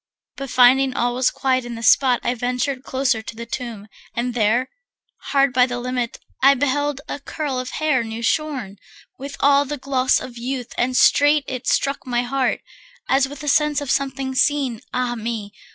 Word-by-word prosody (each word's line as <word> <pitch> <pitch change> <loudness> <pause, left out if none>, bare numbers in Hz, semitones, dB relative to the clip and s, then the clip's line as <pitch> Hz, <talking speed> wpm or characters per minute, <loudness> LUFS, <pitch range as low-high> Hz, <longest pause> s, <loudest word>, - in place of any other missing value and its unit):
But 275 -1 -6
finding 255 +1 +4
all 240 0 0
was 255 +1 +2
quiet 260 -1 0
in 240 -1 -6
the 230 - -8
spot, 250 +1 +4
I 240 - 0
ventured 250 +2 -2
closer 260 -4 0
to 220 - -9
the 235 +1 -7
tomb, 230 -3 -6 0.3
and 245 +1 -2
there, 235 +2 +1 0.6
Hard 275 -2 +2
by 250 0 +4
the 245 -1 -4
limit, 245 -1 -3 0.2
I 275 +1 +6
beheld 290 +1 -1
a - - -5
curl 280 -2 -4
Of 255 0 -5
hair 300 -6 +1
new 225 +1 -6
shorn, 255 -8 -1 0.4
with 280 +1 -7
all 280 0 +5
the 295 +1 -5
gloss 260 -1 +1
of 245 -2 -9
youth 250 0 -4
And 250 +1 0
straight 290 0 +5
it 255 -1 -5
struck 275 -1 0
my 245 -1 0
heart, 260 +1 -1 0.5
as 270 0 +3
with 285 +1 -9
a - - -6
sense 300 0 +2
Of 285 -3 -3
something 270 -1 -1
seen, 265 -4 +1
ah 250 -1 -1
me! 220 -3 -5
255 Hz, 185 wpm, -21 LUFS, 240-275 Hz, 0.6 s, I